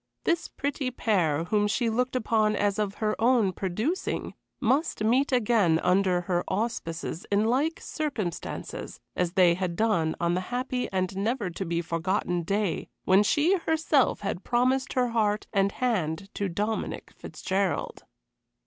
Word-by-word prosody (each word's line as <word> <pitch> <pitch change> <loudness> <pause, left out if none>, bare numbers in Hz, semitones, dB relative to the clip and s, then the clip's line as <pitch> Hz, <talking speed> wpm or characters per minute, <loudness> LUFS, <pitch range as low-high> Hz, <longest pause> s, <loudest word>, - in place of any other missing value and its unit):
This 340 -1 +1
pretty 280 -1 -3
pair, 180 -11 +1
whom 210 +4 +1
she 235 +3 0
looked 250 +3 0
upon 220 -3 +2
as 205 0 0
of 205 -1 -1
her 215 -1 0
own 230 -5 +4
producing, 215 - -2 0.3
must 260 -1 +1
meet 255 +6 +3
again 215 -9 +3
under 185 -1 +3
her 175 0 0
auspices 185 -7 -3
in 205 +2 +3
like 280 +8 +1
circumstances 235 - -4 0.2
as 180 -1 0
they 180 -3 +5
had 175 -1 -2
done 170 -7 +1
on 170 0 +1
the 180 - 0
happy 250 0 -2
and 185 0 -1
never 210 0 -1
to 190 +3 -4
be 170 0 -1
forgotten 175 +1 -1
day 200 +1 -1
when 190 +2 +5
she 305 - +3
herself 320 -4 +2
had 195 -2 -3
promised 255 +2 +1
her 250 -1 +2
heart 215 -2 +1
and 195 -1 +2
hand 195 -6 -1
to 200 -1 -2
Dominic 210 +5 -3
Fitzgerald. 190 0 -2
210 Hz, 150 wpm, -27 LUFS, 185-245 Hz, 0.3 s, they